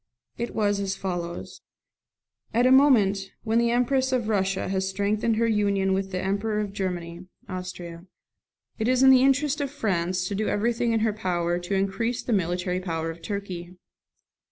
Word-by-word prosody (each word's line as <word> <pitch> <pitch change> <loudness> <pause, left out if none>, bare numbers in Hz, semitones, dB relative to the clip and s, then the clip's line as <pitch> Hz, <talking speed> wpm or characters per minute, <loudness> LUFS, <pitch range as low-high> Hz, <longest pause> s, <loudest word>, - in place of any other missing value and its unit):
It 235 - -4
was 205 -2 +1
as 195 -1 -2
follows: 175 -3 -5 0.9
NOTE. - - +3
At - - +3
a 255 - +5
moment 210 -8 +4
when 225 0 +2
the 235 0 +2
Empress 260 +2 +1
of 240 -4 0
Russia 195 -2 0
has 190 0 -1
strengthened 210 +3 0
her 230 +1 +2
union 200 -3 +1
with 195 0 -1
the 185 -1 -3
Emperor 205 +3 -1
of 205 -2 -3
Germany 180 -2 -4 0.2
(Austria), 180 -1 -7 0.7
it 220 - 0
is 255 0 +3
the 265 -1 +7
interest 280 +2 +2
of 280 - -1
France 185 -8 -1
to 200 - -4
do 210 +2 -1
everything 235 +2 0
in 225 -1 +1
her 220 -1 +1
power 175 -4 -1
to 180 +3 -3
increase 230 +5 -1
the 235 - -1
military 180 -1 0
power 165 -3 -3
of 165 +1 -12
Turkey. 180 -2 -6
200 Hz, 175 wpm, -25 LUFS, 185-230 Hz, 0.9 s, the